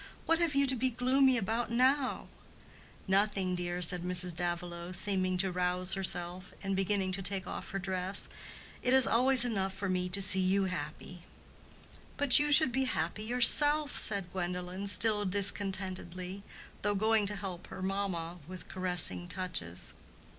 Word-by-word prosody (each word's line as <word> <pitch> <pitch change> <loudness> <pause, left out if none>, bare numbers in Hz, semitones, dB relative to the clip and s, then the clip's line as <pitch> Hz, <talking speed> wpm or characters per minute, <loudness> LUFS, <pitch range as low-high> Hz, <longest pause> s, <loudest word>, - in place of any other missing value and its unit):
What 330 0 +1
have 335 -4 -1
you 280 0 +2
to 265 -1 +1
be 260 +2 -1
gloomy 255 +2 +1
about 225 +3 -3
now?" 260 +3 0 0.8
"Nothing, 195 -1 0
dear," 175 0 -4
said 180 +1 +2
Mrs. 180 0 +1
Davilow, 175 +1 -3
seeming 185 -1 0
to 190 +1 -1
rouse 180 +1 0
herself, 180 -1 -4
and 195 0 -3
beginning 195 0 -1
to 190 +1 -4
take 190 0 -3
off - - -8
her 195 - -5
dress. 190 0 -3 0.5
"It 250 +1 +1
is 265 -2 +6
always 250 +1 +3
enough 195 -5 -3
for 200 +1 -5
me 180 0 -2
to 190 +2 -3
see 190 -1 +2
you 190 +1 0
happy." 175 0 -7 0.9
"But 285 -2 +5
you 295 0 -1
should 290 -3 +6
be 265 +2 -1
happy 190 -1 -4
yourself," 290 +5 +5
said 200 -4 +6
Gwendolen, 180 +1 -6
still 210 +2 +4
discontentedly, 190 -1 -2 0.4
though 205 0 -1
going 215 0 0
to 210 - +1
help 190 -3 -8
her 185 - -9
mamma 185 -3 -5
with 185 -1 -11
caressing 180 -1 0
touches. 165 - -2
190 Hz, 155 wpm, -30 LUFS, 180-220 Hz, 0.9 s, is